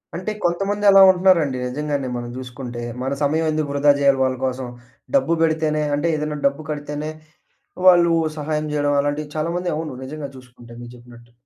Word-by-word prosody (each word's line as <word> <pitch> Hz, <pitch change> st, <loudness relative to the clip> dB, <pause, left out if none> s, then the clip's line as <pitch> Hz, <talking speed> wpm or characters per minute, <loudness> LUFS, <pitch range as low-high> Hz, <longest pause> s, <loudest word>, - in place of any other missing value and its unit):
అంటే, 185 Hz, +5 st, -3 dB
కొంతమంది 195 Hz, +4 st, -1 dB
అలా 195 Hz, 0 st, +8 dB
ఉంటున్నారండి? 180 Hz, -7 st, +2 dB
నిజంగానే 140 Hz, +1 st, -3 dB
మనం 120 Hz, 0 st, -6 dB
చూసుకుంటే. 125 Hz, -1 st, -7 dB, 0.2 s
మన 135 Hz, +1 st, -1 dB
సమయం 155 Hz, +3 st, +1 dB
ఎందుకు 155 Hz, -1 st, -2 dB
వృధా 145 Hz, +1 st, +4 dB
చేయాలి 140 Hz, -1 st, +3 dB
వాళ్ళ 130 Hz, 0 st, 0 dB
కోసం? 130 Hz, 0 st, -3 dB, 0.5 s
డబ్బు 215 Hz, -11 st, +2 dB
పెడితేనే, 155 Hz, -1 st, +1 dB
అంటే 150 Hz, +4 st, 0 dB
ఏదైనా 150 Hz, 0 st, -3 dB
డబ్బు 140 Hz, +3 st, -4 dB
కడితేనే 150 Hz, +1 st, -5 dB, 0.8 s
వాళ్ళు 175 Hz, -2 st, +6 dB, 0.3 s
సహాయం 150 Hz, +1 st, -2 dB
చేయడం 145 Hz, -1 st, +1 dB
అలాంటివి 145 Hz, +1 st, -3 dB
చాలా 155 Hz, +2 st, -1 dB
మంది 180 Hz, 0 st, -2 dB
అవును. 155 Hz, -1 st, -4 dB
నిజంగా 145 Hz, +1 st, -6 dB
చూసుకుంటే. 125 Hz, -2 st, -16 dB
మీరు 120 Hz, -, -10 dB
చెప్పినట్టు. 120 Hz, -1 st, -16 dB
150 Hz, 160 wpm, -21 LUFS, 130-160 Hz, 0.8 s, అలా